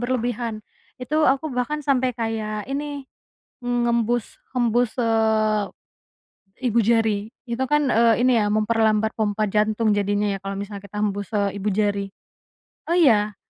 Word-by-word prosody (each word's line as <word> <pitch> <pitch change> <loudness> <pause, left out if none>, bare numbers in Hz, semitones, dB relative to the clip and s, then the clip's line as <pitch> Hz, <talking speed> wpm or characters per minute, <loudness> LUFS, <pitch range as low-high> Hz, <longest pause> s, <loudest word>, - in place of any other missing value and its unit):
berlebihan. 240 -3 -2 0.4
Itu 305 +5 +1
aku 275 +3 +1
bahkan 265 +5 -2
sampai 260 -2 +2
kayak 215 -2 -3
ini, 285 0 -4 0.6
ngembus, 240 -1 0 0.2
hembus, 240 -1 +1
eee, 220 -2 +2 1.1
ibu 235 +1 +3
jari. 220 -2 +1 0.2
Itu 235 +3 -1
kan, 295 -2 +2
eee, 230 0 +4
ini 255 -2 +4
ya 210 - +1
memperlambat 215 0 +2
pompa 215 0 0
jantung 215 +1 +1
jadinya 205 0 +1
ya, 195 - -3
kalau 195 +1 -5
misalnya 200 0 -6
kita 210 +2 -8
hembus, 200 -1 -2
eee, 200 -1 0
ibu 200 - -5
jari. 200 0 0 0.8
Oh, 340 - +2
iya. 210 -9 +4
225 Hz, 140 wpm, -23 LUFS, 210-245 Hz, 1.1 s, eee